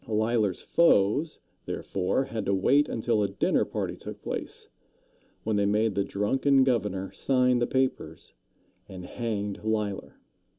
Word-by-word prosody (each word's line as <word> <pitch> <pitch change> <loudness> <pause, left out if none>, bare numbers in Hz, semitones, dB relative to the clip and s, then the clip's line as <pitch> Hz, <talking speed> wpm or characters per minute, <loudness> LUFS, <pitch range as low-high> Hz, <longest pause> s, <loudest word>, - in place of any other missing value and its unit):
Leisler's 110 -3 0
foes, 150 -1 +2 0.3
therefore, 95 +7 -1
had 115 -5 -4
to 100 - +2
wait 140 +10 +3
until 115 -1 0
a 100 - +2
dinner - - +1
party - - -4
took - - -9
place, - - -6 0.8
when 110 -1 0
they 100 - +2
made 105 +1 +1
the 100 - 0
drunken 135 +8 +2
governor 105 -7 -1
sign 125 +4 +2
the 120 - +1
papers, 130 - -2 0.6
and 90 -1 -8
hanged 105 -2 -4
Leisler. 105 -3 -2
110 Hz, 135 wpm, -27 LUFS, 100-125 Hz, 0.8 s, wait